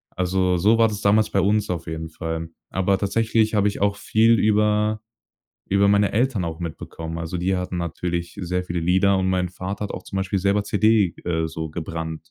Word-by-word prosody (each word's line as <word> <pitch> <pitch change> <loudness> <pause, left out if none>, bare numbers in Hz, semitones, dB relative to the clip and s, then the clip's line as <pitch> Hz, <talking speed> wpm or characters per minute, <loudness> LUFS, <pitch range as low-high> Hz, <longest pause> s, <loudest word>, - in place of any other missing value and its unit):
Also, 90 0 +1
so 105 +6 +4
war 115 -1 +4
das 105 -2 -5
damals 105 +1 +3
bei 100 - +2
uns 105 +2 +1
auf 85 -2 -3
jeden 80 0 -5
Fall. 80 0 -5 0.2
Aber 95 +1 +1
tatsächlich 110 +2 +1
habe 105 -1 +3
ich 100 - -7
auch 100 0 +1
viel 115 +2 +3
über 105 0 +2 0.7
über 100 +1 +3
meine 100 0 +3
Eltern 115 -3 +1
auch 80 0 -5
mitbekommen. 80 0 -6
Also, 85 +2 -4
die 95 +2 0
hatten 90 0 -3
natürlich 85 +1 -4
sehr 90 0 -2
viele 85 -1 -3
Lieder 95 +3 +3
und 95 0 0
mein 90 -1 0
Vater 95 +3 -5
hat 100 - -5
auch - - -7
zum - - -7
Beispiel 95 +1 0
selber 100 +2 +2
CD, 105 -3 +3
äh, 80 -2 0
so 80 -1 -5
gebrannt. 80 0 -6
95 Hz, 200 wpm, -23 LUFS, 85-105 Hz, 0.7 s, so